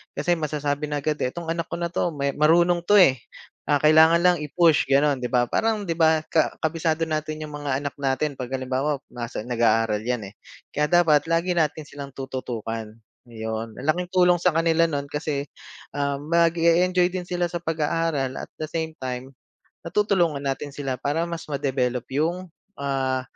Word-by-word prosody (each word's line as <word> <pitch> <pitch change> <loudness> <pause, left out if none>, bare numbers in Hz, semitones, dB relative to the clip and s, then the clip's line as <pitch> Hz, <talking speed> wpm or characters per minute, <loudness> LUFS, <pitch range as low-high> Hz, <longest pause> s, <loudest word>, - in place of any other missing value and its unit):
kasi 175 0 +1
masasabi 150 -1 -2
na 145 -1 -3
agad, 155 -1 -1
eh, 125 - -1
"itong 165 -1 -4
anak 165 -1 -3
ko - - -1
na 170 - -1
'to 175 - 0
may 140 0 0
marunong 170 +3 +4
'to, 205 +4 +3
eh, 135 -10 +6 0.5
ah, 145 - +3
kailangan 160 +2 +6
lang 180 -1 +5
i-push" 160 0 +3
gano'n, 140 0 +3
'di 125 - -2
ba? 125 -1 +3
Parang 220 -2 +1
'di 165 - -1
ba, 160 -1 +4
ka 160 - +1
kabisado 160 0 0
natin 155 0 -3
yung 150 - -8
mga 145 -2 -2
anak 145 -1 -4
natin, 140 +1 -1
pag 125 - -4
halimbawa 130 +2 -1
nasa 120 -3 -5
nag-aaral 115 -3 +1
yan, 120 -4 -2
eh, - - -28 0.4
kaya 150 +1 +2
dapat 165 -4 +4
lagi 165 +2 +1
natin 155 -1 0
silang 140 -1 -9
tututukan, 115 -5 -5 0.3
'yon. 110 -1 -5
Ang - - -8
laking 175 +3 0
tulong 180 -1 +5
sa 180 - +4
kanila 165 0 +3
no'n 140 -1 -3
kasi, 150 -2 -2 0.5
ah, 140 -1 0
mag 165 +3 +3
e-enjoy 175 +2 +3
din 180 -1 -5
sila 175 -1 -1
sa 175 - -3
pag-aaral 160 -3 -1
at - - -7
the 155 - -3
same 160 0 -3
time 130 +1 -5 0.6
natutulungan 175 -6 +1
natin 140 +1 -2
sila 135 -3 -3
para 145 +4 0
mas 170 -1 -6
ma-develop 130 -4 -1
yung, 170 +5 -1 0.3
ah, 135 -2 -1
150 Hz, 180 wpm, -24 LUFS, 135-165 Hz, 0.6 s, eh